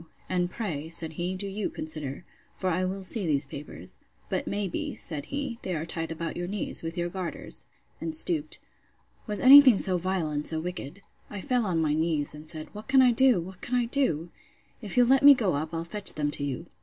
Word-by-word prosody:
—And 180 -1 0
pray, 160 -8 -4
said 165 -1 0
he, 175 +3 -3
do 195 +2 -6
you 200 +1 -3
consider. 155 -1 -6 0.3
For 185 -1 -1
I 180 +2 0
will 190 +1 -4
see 190 0 0
these 145 -2 +1
papers. 140 - -10 0.3
But - - -2
may 205 0 -1
be, 175 - -4
said 150 -4 -2
he, 275 - -4
they 185 - -3
are 160 +1 -3
tied 165 -1 -4
about 165 0 -4
your 175 0 -4
knees, 200 +1 -1
with 165 +1 -6
your 175 0 -1
garters, 180 -1 -5 0.3
and 320 - -1
stooped. 315 -1 +2 0.7
Was 210 -2 -1
ever - - -3
any 280 +2 +12
thing 255 -7 +5
so 185 -2 +2
vile 180 -3 -1
and 150 0 -1
so 160 - +1
wicked?—I 180 +4 -8
fell 250 -3 0
on 170 -3 0
my 155 -2 +1
knees, 155 -2 0
and 150 +1 -11
said, 155 -1 -7
What 210 +1 -9
can 265 0 +5
I 250 - +5
do? 255 -3 +4
What 180 +2 -10
can 250 - -2
I 245 -1 +2
do? 205 - -1 0.5
If 210 0 -7
you'll 245 - +6
let 265 +2 +4
me 285 0 +9
go 215 -8 0
up 155 +3 -3
I'll 165 0 -3
fetch 200 +4 -1
them 145 -1 -1
to 145 - -4
you. 145 +4 -4
180 Hz, 225 wpm, -27 LUFS, 160-215 Hz, 0.7 s, any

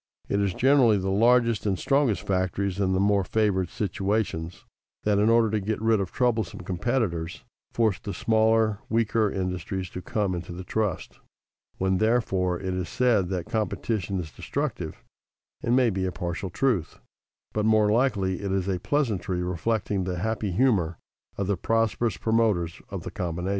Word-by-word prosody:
It 100 - 0
is 100 -2 0
generally 130 -5 +5
the 95 0 -1
largest 115 +1 +3
and 95 -2 +1
strongest 135 -5 +1
factories, 95 +1 -1
in 95 -2 +1
the 95 - +1
more 100 0 +3
favored 95 -3 +1
situations, 95 -4 -2 0.4
that, 105 -1 +2
in 105 +2 +4
order 115 -2 +4
to 110 - +1
get 105 +2 -2
rid 110 -1 +2
of 95 -2 -3
troublesome 115 -10 0
competitors, 90 -3 -2 0.3
force 110 -6 +1
the 100 - -6
smaller, 110 +1 +2
weaker, 110 -1 +2
industries 90 0 -3
to 90 - -6
come 100 +1 -1
into 85 0 -5
the 90 +2 -7
trust. 105 0 -2 0.6
When, 95 0 +1
therefore, 95 -6 +1
it 95 -1 -3
is 90 -1 -3
said 115 -8 +2
that 90 -3 -2
competition 105 -3 -2
is 80 -4 -6
destructive, - - -4 0.6
it - - -3
may 125 -1 +4
be 95 -1 -1
a 95 - -1
partial 85 +2 -4
truth, 105 - 0 0.6
but 105 - 0
more 110 -1 +4
likely 100 -7 +1
it 100 -1 -2
is 95 -1 0
a 95 -2 0
pleasantry 100 -8 -1
reflecting 95 +2 -1
the 90 -1 -2
happy 110 +2 -1
humor 90 -7 +2 0.4
of 100 - -1
the 100 0 0
prosperous 115 +3 0
promoters 110 -7 +1
of - - -5
the - - -6
combination. 90 +1 -3
100 Hz, 165 wpm, -26 LUFS, 90-110 Hz, 0.6 s, generally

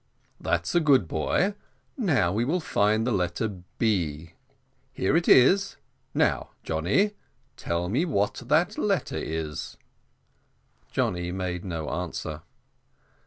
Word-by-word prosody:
"That's 85 0 -1
a 175 - +5
good 140 - +4
boy; 130 - +1 0.4
now 135 - +2
we 110 +3 +1
will 160 +9 +1
find 110 -7 +1
the 125 - 0
letter 95 +1 -1 0.2
B. 85 -8 -1 0.6
Here 95 - 0
it 170 +1 +2
is: 195 +10 +5 0.4
now, - - +1
Johnny, 90 - +1 0.4
tell 85 +1 -2
me 130 - +1
what 105 - 0
that 170 - +2
letter 195 - 0
is." 80 -2 -4 1.1
Johnny 90 0 -1
made 90 -1 -3
no 80 -5 -4
answer. 80 -3 -4
100 Hz, 120 wpm, -26 LUFS, -, 1.1 s, a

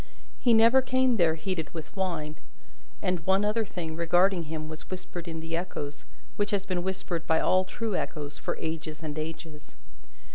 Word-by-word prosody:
He 240 -2 +5
never 230 +4 +7
came 255 -1 +3
there 165 -4 +4
heated 165 -1 -3
with 160 +4 -7
wine. 165 -6 -2 0.7
And 180 -1 +1
one 190 +4 +3
other 215 +2 +2
thing 175 -6 -5
regarding 175 +2 +3
him 155 0 -4
was 155 0 -8
whispered 180 -2 -6
in 160 -1 -4
the 165 0 -3
echoes, 145 -4 -4 0.3
which 205 0 +1
has 200 -1 0
been 185 -2 -1
whispered 185 -2 -3
by 160 - +4
all 185 0 +4
true 220 +1 -2
echoes 150 -4 -3
for - - -2
ages 160 0 -4
and 150 -2 -3
ages. 160 -1 -7
175 Hz, 175 wpm, -29 LUFS, 160-195 Hz, 0.7 s, never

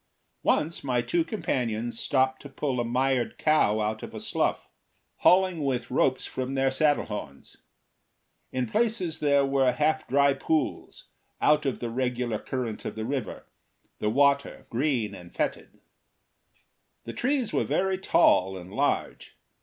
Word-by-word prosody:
Once 160 +2 0
my 125 -3 +1
two 125 +8 +1
companions 120 - -2
stopped 130 -1 +1
to 140 - -10
pull 135 -2 -2
a - - +1
mired 125 +1 0
cow 155 -9 +3
out 110 +1 -2
of - - -8
a - - -5
slough, - - -1 0.5
hauling 185 -3 +4
with 125 -4 -2
ropes 130 0 +1
from 130 +1 -4
their 135 0 +2
saddle 145 +2 +2
horns. 75 -10 -8 0.9
In 130 -1 -1
places 185 - 0
there 140 -2 +3
were 135 -2 +3
half 155 +3 0
dry 140 +1 +4
pools, 150 +1 -2 0.3
out 150 -1 +3
of 135 - -2
the 120 -1 -3
regular 125 -2 -1
current 120 -4 -4
of - - -5
the 110 0 -4
river, 130 -4 -4 0.5
the 105 - 0
water 140 +3 +2
green 125 -4 0
and 85 -1 -11
fetid. - - -3 1.2
The 115 - -7
trees 260 -2 0
were - - +2
very 190 0 0
tall 95 - +3
and 90 +1 -10
large. - - -2
130 Hz, 145 wpm, -27 LUFS, 120-150 Hz, 1.2 s, hauling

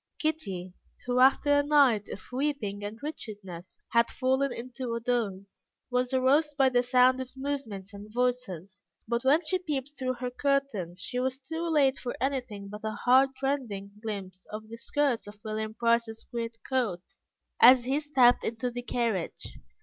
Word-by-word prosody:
Kitty, 195 - -2 0.3
who, 250 0 +1
after 285 +2 +5
a - - +2
night 280 -8 +4
of 190 - -7
weeping 250 -7 -2
and 205 +2 -5
wretchedness, 200 - -7
had 235 0 +3
fallen 265 +1 +1
into 245 0 -5
a - - -2
doze, 210 -5 -3 0.2
was 250 0 +1
aroused 280 +3 +2
by 270 -2 +5
the 245 -1 +3
sound 250 +1 +4
of 255 - -6
movements 230 -8 -4
and 205 +1 -10
voices, 220 -7 -2 0.3
but 235 +1 -1
when 285 +5 +4
she 370 +4 +1
peeped 290 -6 -3
through 255 -1 0
her 250 0 -4
curtains, 250 -11 -1
she 250 - -3
was 260 0 -1
too 320 +5 -4
late 280 -4 +3
for 245 - -4
anything 250 -7 -2
but 210 +1 -8
a 220 0 -2
heartrending 260 -5 +2
glimpse 195 -4 -6
of 215 +1 -7
the 230 - -8
skirts 265 -2 0
of 205 0 -11
William 215 0 -3
Price's 235 -1 +1
great 230 -1 -4
coat, 230 -10 0 0.6
as 250 0 +8
he 270 +3 +1
stepped 270 -5 +4
into 235 +2 -2
the 245 +1 -5
carriage. 230 -7 -2
245 Hz, 165 wpm, -29 LUFS, 215-270 Hz, 0.6 s, as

